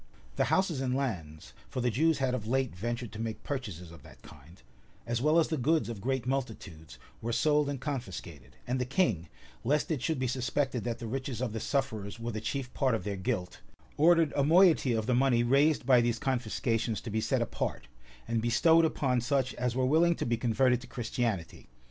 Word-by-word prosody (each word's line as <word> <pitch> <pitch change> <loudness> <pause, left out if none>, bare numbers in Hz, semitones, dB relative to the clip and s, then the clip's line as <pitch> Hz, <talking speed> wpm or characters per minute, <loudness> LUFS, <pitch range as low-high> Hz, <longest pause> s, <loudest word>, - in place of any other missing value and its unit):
The - - +2
houses 175 -8 +1
and 130 -1 0
lands, 85 - -4 0.2
(for - - -4
the 125 -1 +1
Jews 160 +6 +2
had 130 -2 0
of 110 -4 -3
late 130 -3 0
ventured 120 +4 -4
to 110 0 -7
make 115 -1 -4
purchases 100 - -5
of 85 -4 -13
that - - -16
kind,) 75 +6 -15 0.5
as 120 0 -1
well 155 +4 +3
as 165 - +3
the 160 - -1
goods 150 +2 +1
of 110 -4 -6
great 130 0 -1
multitudes, 100 - -4 0.2
were 115 - -2
sold 150 +3 +2
and 140 -2 -3
confiscated; 85 - -6
and 125 +1 -1
the - - 0
king, 120 - 0 0.3
lest 150 +6 +1
it 145 -6 -1
should 160 +3 0
be 130 - -1
suspected 130 0 -1
that 120 -1 -2
the 120 - -7
riches 130 +1 -4
of 125 -4 -2
the 110 - -3
sufferers 110 -6 -2
were 115 +1 -3
the 110 -1 -4
chief 125 +3 -4
part 130 -4 +1
of - - -4
their 100 -1 -3
guilt, 95 -2 -3 0.3
ordered 165 0 +4
a 140 - +2
moiety 165 -4 +5
of 110 -1 -1
the 125 - +1
money 125 -1 +3
raised 140 +4 +3
by 125 -2 +6
these 120 -1 0
confiscations 120 -3 -1
to 115 - -6
be 110 +1 0
set - - +1
apart, - - -4 0.4
and 115 0 0
bestowed 160 +8 +4
upon 130 -5 0
such 130 0 0
as 125 0 -2
were 130 0 +1
willing 165 +5 +4
to - - -3
be 120 - +1
converted 125 +2 +2
to 125 - -11
Christianity. 115 - -3
125 Hz, 210 wpm, -30 LUFS, 110-135 Hz, 0.5 s, by